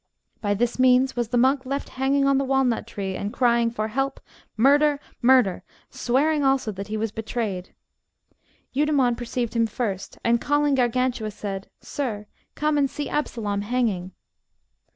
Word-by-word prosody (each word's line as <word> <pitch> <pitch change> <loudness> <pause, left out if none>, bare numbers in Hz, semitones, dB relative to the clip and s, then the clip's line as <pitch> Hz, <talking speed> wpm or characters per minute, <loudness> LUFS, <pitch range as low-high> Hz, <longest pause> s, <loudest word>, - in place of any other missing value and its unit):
By 205 -1 0
this 240 +4 -1
means 255 +1 +4
was 240 -2 -1
the 245 - -1
monk 260 +2 +3
left 275 +2 -4
hanging 275 +1 +1
on 275 -1 +3
the - - +1
walnut 265 -3 +1
tree, 195 -2 -4
and 205 - -3
crying 235 -2 +2
for 220 -2 -3
help, 270 +4 -2 0.4
murder, 285 +4 +4 0.2
murder, 245 -7 +4 0.3
swearing 290 +5 +1
also 270 -4 +2
that 195 0 -7
he 215 +1 -3
was 220 0 -2
betrayed. 220 -4 -4 1.0
Eudemon 275 -3 +2
perceived 240 0 -3
him 230 -1 +3
first, 200 -4 -4
and 235 0 +2
calling 290 0 +2
Gargantua 250 -3 +1
said, 195 -2 -6
Sir, 220 -7 -4 0.3
come 300 0 +1
and 275 -1 +2
see 290 +3 -5
Absalom 215 -8 -2
hanging. 205 -5 -1
245 Hz, 150 wpm, -24 LUFS, 215-270 Hz, 1.0 s, means